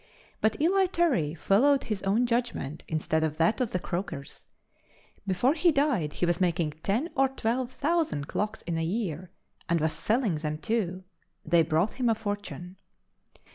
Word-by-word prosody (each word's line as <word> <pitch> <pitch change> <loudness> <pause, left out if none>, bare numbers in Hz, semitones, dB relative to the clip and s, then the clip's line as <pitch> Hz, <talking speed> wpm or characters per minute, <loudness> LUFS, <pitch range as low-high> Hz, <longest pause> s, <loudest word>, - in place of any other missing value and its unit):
But 220 0 +1
Eli 375 +5 +3
Terry 270 - +1
followed 265 - +3
his 210 -4 -3
own 210 +6 +2
judgment 235 - -2
instead 160 0 0
of 155 -1 -1
that 165 +10 +2
of 245 - 0
the - - 0
croakers; 170 -6 -5 0.8
before 195 +9 +2
he 340 +2 +3
died 275 - +1
he - - 0
was 175 +1 0
making 170 -3 +1
ten 230 - 0
or 270 0 +3
twelve 250 0 -1
thousand 290 - 0
clocks 215 +4 -3
in 170 -2 -2
a - - 0
year 180 -2 -2 0.4
and 170 0 +3
was 155 0 +1
selling 220 - +1
them 150 0 -3
too. 185 -1 -2 0.4
They 170 +1 +4
brought 165 +9 0
him 245 - +3
a 225 - +3
fortune. 205 -4 -5
200 Hz, 165 wpm, -28 LUFS, 165-250 Hz, 0.8 s, They